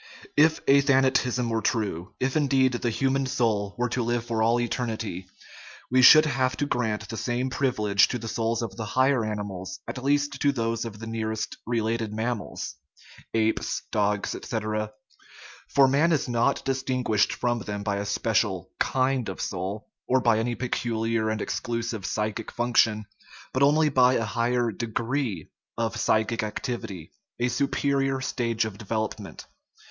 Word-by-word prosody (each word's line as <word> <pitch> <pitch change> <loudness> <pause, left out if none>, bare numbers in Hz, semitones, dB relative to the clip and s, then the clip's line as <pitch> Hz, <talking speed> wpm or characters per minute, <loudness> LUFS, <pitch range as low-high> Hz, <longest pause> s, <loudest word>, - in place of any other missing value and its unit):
If 160 +2 +4
athanatism 135 -3 +3
were 115 -1 0
true, 105 -7 -2
if, 130 +1 0
indeed, 135 -3 +3
the 120 0 -1
human 135 +3 0
soul 110 -6 0
were 125 0 0
to 125 - -1
live 120 0 -1
for 115 -2 -1
all 115 +2 +3
eternity, 110 -6 -3 0.6
we 130 0 +5
should 155 +5 +9
have 130 -3 0
to 145 - 0
grant 110 -5 -1
the 115 - -5
same 125 +3 -1
privilege 105 -8 +2
to - - -3
the 115 -1 -7
souls 115 +1 -1
of 115 - -5
the 110 - -4
higher 130 -2 +4
animals, 100 -3 -5
at 125 - -5
least 145 +1 +1
to 145 - +4
those 115 -3 -2
of 110 -2 -7
the 115 - -8
nearest 110 -1 -3
related 115 -1 -1
mammals 110 0 -3 0.6
(apes, 110 0 0
dogs, 105 -1 0
etc.). 110 -1 -3 0.8
For 135 -1 +5
man 145 +6 +3
is 155 - +1
not 120 +3 +1
distinguished 130 -5 +1
from 120 -1 -1
them 105 -1 -5
by 100 -1 -1
a 100 - -3
special - - 0
kind 130 -3 +1
of 95 - -6
soul, 100 +4 -4 0.2
or 130 - +3
by 115 -3 +3
any 120 +1 -1
peculiar 115 -3 -1
and 110 -1 -1
ex - - -2
clusive 115 -4 -3
psychic 105 +3 -2
function, 115 -3 +2 0.5
but 130 - 0
only 150 +2 +5
by 130 -2 +4
a 115 - 0
higher 120 +2 0
de 120 +3 -4
gree 115 - -2 0.3
of 115 -1 -1
psychic 110 +1 +1
activity, 105 - -5 0.3
a 120 +1 +1
superior 135 +1 0
stage 115 -4 -1
of 105 -2 -7
develop 110 0 -2
ment. - - -10
115 Hz, 160 wpm, -26 LUFS, 110-130 Hz, 0.8 s, should